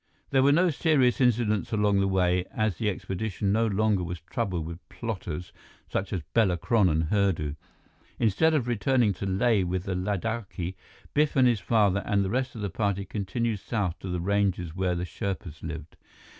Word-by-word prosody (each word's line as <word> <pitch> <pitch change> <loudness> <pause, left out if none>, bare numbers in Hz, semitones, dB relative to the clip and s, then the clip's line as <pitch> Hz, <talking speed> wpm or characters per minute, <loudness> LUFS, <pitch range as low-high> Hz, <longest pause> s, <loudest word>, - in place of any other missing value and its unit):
There 135 - +4
were 140 +2 +5
no 175 +4 +4
serious 140 -5 +2
incidents 115 -4 +2
along 105 -2 +2
the 100 - +2
way, 90 -1 +2
as 110 -5 -1
the 105 - +1
expedition 100 +1 -2
no 115 +2 +2
longer 105 -2 +1
was 85 0 -5
troubled 85 0 -3
with 85 +2 -9
plotters 90 -7 -5 0.3
such 95 0 -2
as 90 -6 -2
Bela 100 -7 +3
Kron 105 +1 +3
and 80 0 +1
Hurdu. 95 -8 +1 0.6
Instead 120 +9 +3
of 130 -5 0
returning 120 -1 +2
to 100 +2 -5
Leh 105 +2 +2
with 90 0 -1
the 95 - -3
Ladakhi, 100 -1 -3 0.4
Biff 150 0 +2
and 130 -2 +5
his 120 -4 +2
father 100 -4 +2
and 100 -1 +1
the 95 - -2
rest 130 +1 -1
of 110 - -6
the 100 - -2
party 100 -1 -1
continued 105 +3 -2
south 100 -5 -2
to 95 - -6
the 90 0 -2
ranges 95 -3 0
where 90 -1 0
the 85 +1 -2
Sherpas 90 -4 -5
lived. 80 -1 -7
100 Hz, 185 wpm, -27 LUFS, 90-115 Hz, 0.6 s, were